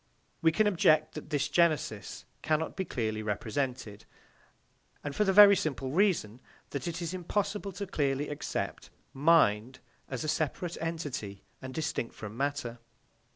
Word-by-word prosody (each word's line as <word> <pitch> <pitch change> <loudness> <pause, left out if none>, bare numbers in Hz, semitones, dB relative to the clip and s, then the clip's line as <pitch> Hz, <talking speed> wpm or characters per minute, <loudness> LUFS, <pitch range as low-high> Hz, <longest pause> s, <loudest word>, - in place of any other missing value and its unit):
We 160 - +5
can 215 +7 +2
object 155 -6 +3
that 155 - -8
this 145 -1 0
genesis 150 - 0 0.2
cannot 155 +1 0
be 190 - -2
clearly 110 -7 -2
represented, 110 0 -3 1.0
and 145 - -4
that - - -12
for 210 - +3
the 195 - +2
very 200 +1 +9
simple 135 -6 -2
reason 160 - +1 0.3
that 140 +5 -4
it 170 +1 -3
is 170 +1 -3
impossible 200 +3 -2
to 200 - -4
clearly 145 -5 -1
accept 145 0 -4 0.2
"mind" 130 -6 +3 0.3
as 130 -3 -3
a - - -3
separate 165 +3 -1
entity 145 -12 -4 0.2
and 130 -1 -6
distinct 140 -5 -3
from 110 0 -8
matter. 135 -3 -2
150 Hz, 150 wpm, -30 LUFS, 125-170 Hz, 1.0 s, very